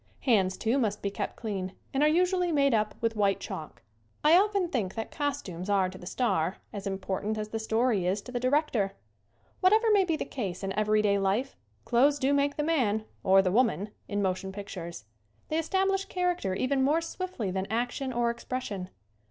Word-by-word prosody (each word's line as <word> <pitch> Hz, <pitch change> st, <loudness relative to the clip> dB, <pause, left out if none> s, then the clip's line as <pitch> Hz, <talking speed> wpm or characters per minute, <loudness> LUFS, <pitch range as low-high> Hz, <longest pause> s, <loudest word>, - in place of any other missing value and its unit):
Hands, 195 Hz, -7 st, +2 dB
too, 235 Hz, +5 st, +1 dB
must 210 Hz, -4 st, -1 dB
be 200 Hz, -, -1 dB
kept -, -, -4 dB
clean 195 Hz, -4 st, -4 dB, 0.2 s
and 270 Hz, -, +1 dB
are 300 Hz, -, +5 dB
usually 360 Hz, +2 st, +2 dB
made 280 Hz, -4 st, +3 dB
up 215 Hz, -1 st, +1 dB
with 230 Hz, -1 st, 0 dB
white 200 Hz, -2 st, +2 dB
chalk. 155 Hz, -2 st, -7 dB, 0.4 s
I 305 Hz, +3 st, +7 dB
often 400 Hz, -1 st, +3 dB
think 220 Hz, -, -2 dB
that 225 Hz, -1 st, -4 dB
costumes 205 Hz, -, -3 dB
are 195 Hz, -2 st, +3 dB
to 185 Hz, -, -10 dB
the 180 Hz, -, -9 dB
star 185 Hz, -7 st, 0 dB, 0.2 s
as 200 Hz, -1 st, -5 dB
important 195 Hz, +2 st, -2 dB
as 215 Hz, 0 st, -4 dB
the 225 Hz, -, -3 dB
story 220 Hz, -3 st, +1 dB
is 190 Hz, +3 st, +1 dB
to 250 Hz, -, -9 dB
the 245 Hz, -, -2 dB
director. 255 Hz, -7 st, +1 dB, 0.7 s
Whatever 435 Hz, +4 st, +4 dB
may 405 Hz, -2 st, +5 dB
be 335 Hz, -3 st, 0 dB
the -, -, -3 dB
case 195 Hz, -8 st, -4 dB
in 195 Hz, 0 st, -2 dB
everyday 210 Hz, -1 st, +2 dB
life 200 Hz, +8 st, 0 dB, 0.3 s
clothes 275 Hz, +4 st, +4 dB
do 275 Hz, 0 st, +1 dB
make 285 Hz, 0 st, +2 dB
the 300 Hz, -, 0 dB
man, 235 Hz, -10 st, +1 dB, 0.2 s
or 195 Hz, 0 st, +6 dB
the 185 Hz, -, +1 dB
woman, 215 Hz, -2 st, +2 dB, 0.2 s
in 205 Hz, 0 st, -1 dB
motion 190 Hz, 0 st, -1 dB
pictures. 180 Hz, -, -7 dB, 0.4 s
They 315 Hz, -, +1 dB
establish 385 Hz, +4 st, +1 dB
character 360 Hz, -, -1 dB
even 265 Hz, +5 st, +1 dB
more 300 Hz, +5 st, +3 dB
swiftly 330 Hz, -, -4 dB
than 190 Hz, +1 st, -2 dB
action 245 Hz, +4 st, -1 dB
or 240 Hz, -1 st, +1 dB
expression. 235 Hz, -6 st, -5 dB
225 Hz, 190 wpm, -29 LUFS, 195-290 Hz, 0.7 s, I